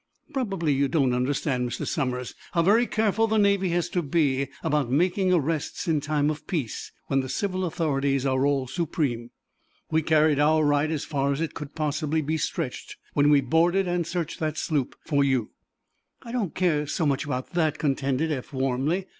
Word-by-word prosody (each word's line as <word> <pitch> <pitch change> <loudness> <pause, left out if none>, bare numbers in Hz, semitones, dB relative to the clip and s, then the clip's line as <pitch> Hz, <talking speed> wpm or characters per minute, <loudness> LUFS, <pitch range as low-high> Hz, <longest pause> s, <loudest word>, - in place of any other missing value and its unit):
"Probably 195 - 0
you 140 +1 +2
don't 135 -2 +2
understand, 125 0 0
Mr. 120 - -4
Somers, 125 -6 -2 0.2
how 170 - +3
very 225 +7 +4
careful 220 +1 +1
the 220 0 +1
Navy 200 -2 +3
has 175 0 0
to 180 - 0
be 140 -3 +1 0.2
about 145 -4 +1
making 180 +7 +2
arrests 165 +2 -1
in 155 -3 +2
times 150 0 +1
of 155 - -8
peace, 145 - -3
when 135 - +1
the 130 -1 -3
civil 185 +6 -1
authorities 140 -5 0
are 130 0 +1
all 140 -2 +1
supreme. 135 -4 -2 0.6
We 160 0 +3
carried 155 -1 +3
our 155 +1 +4
right 145 +1 +2
as 155 -3 -2
far 140 -2 0
as 140 - -1
it 165 -1 -2
could 150 -2 -8
possibly 155 0 -1
be 155 +3 -1
stretched 130 -4 -4 0.2
when 145 0 +4
we 145 -1 +5
boarded 170 +8 +2
and 175 -2 -1
searched 170 -3 -3
that 155 -1 -2
sloop 145 -5 -1
for 145 -3 +2
you." 130 -5 0 0.7
"I 230 - -8
don't 225 -9 -2
care 155 -5 +1
so 160 +2 -1
much 140 0 0
about 130 -3 -4
that," 160 -4 +1
contended 140 +1 0
Eph, 130 -4 -4
warmly. 135 +7 0
150 Hz, 185 wpm, -26 LUFS, 135-170 Hz, 0.7 s, we